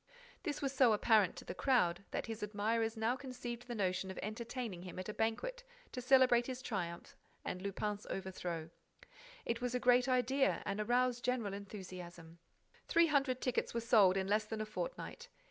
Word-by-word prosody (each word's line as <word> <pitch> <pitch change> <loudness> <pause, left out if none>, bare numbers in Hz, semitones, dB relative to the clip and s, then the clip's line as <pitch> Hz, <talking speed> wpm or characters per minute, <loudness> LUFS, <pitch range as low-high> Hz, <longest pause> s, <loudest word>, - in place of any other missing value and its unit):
This 295 -5 -3
was 275 -1 0
so 255 -4 +5
apparent 215 -2 +4
to - - -9
the - - -5
crowd 195 -9 +2
that - - -3
his 225 -1 -6
admirers 220 +2 0
now 225 +3 +1
conceived 245 -2 -6
the 240 - -4
notion 190 -2 0
of 190 - -7
entertaining 225 -2 -4
him 180 -1 -8
at 185 - -5
a - - -3
banquet - - -1 0.3
to 250 - -4
celebrate 250 -2 +5
his 260 0 -5
triumph 170 -6 -4 0.3
and 180 - -3
Lupin's 205 +1 -3
overthrow. 175 -4 -4 0.7
It 230 +1 -1
was 250 0 -1
a - - +1
great 245 +1 +4
idea 260 +2 +2
and 200 - -2
aroused 245 +2 +1
general 240 -5 0
enthusiasm. 180 -4 -8 0.5
Three 335 0 +5
hundred 275 -5 +1
tickets 250 -2 -1
were - - +2
sold 210 -6 +5
in 190 - 0
less 210 +2 +2
than 220 0 -4
a - - -2
fortnight. 485 - -5
225 Hz, 180 wpm, -36 LUFS, 195-250 Hz, 0.7 s, so